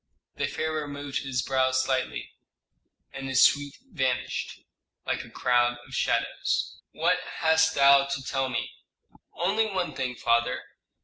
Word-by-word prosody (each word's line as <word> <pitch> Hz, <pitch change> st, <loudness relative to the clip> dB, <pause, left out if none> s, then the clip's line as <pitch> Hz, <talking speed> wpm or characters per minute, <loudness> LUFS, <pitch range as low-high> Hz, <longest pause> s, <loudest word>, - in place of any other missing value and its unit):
The -, -, 0 dB
pharaoh 155 Hz, -1 st, -2 dB
moved 145 Hz, -1 st, -4 dB
his 130 Hz, -3 st, -2 dB
brows 130 Hz, -1 st, +2 dB
slightly, 130 Hz, -1 st, -2 dB, 0.8 s
and 135 Hz, 0 st, -6 dB
his 130 Hz, -1 st, +5 dB
suite 145 Hz, -1 st, +3 dB
vanished, 130 Hz, -, -2 dB, 0.4 s
like -, -, -2 dB
a -, -, -13 dB
crowd 120 Hz, 0 st, +2 dB
of 135 Hz, -, -14 dB
shadows. -, -, -1 dB
"What -, -, +1 dB, 0.2 s
hast 160 Hz, 0 st, +4 dB
thou 140 Hz, 0 st, +6 dB
to 140 Hz, -1 st, -4 dB
tell 135 Hz, 0 st, -1 dB
me?" 125 Hz, -, -3 dB, 0.6 s
"Only 210 Hz, +5 st, +1 dB
one 190 Hz, -4 st, -2 dB
thing, 125 Hz, -1 st, -3 dB
father. 120 Hz, 0 st, +1 dB
135 Hz, 135 wpm, -27 LUFS, 130-145 Hz, 0.8 s, thou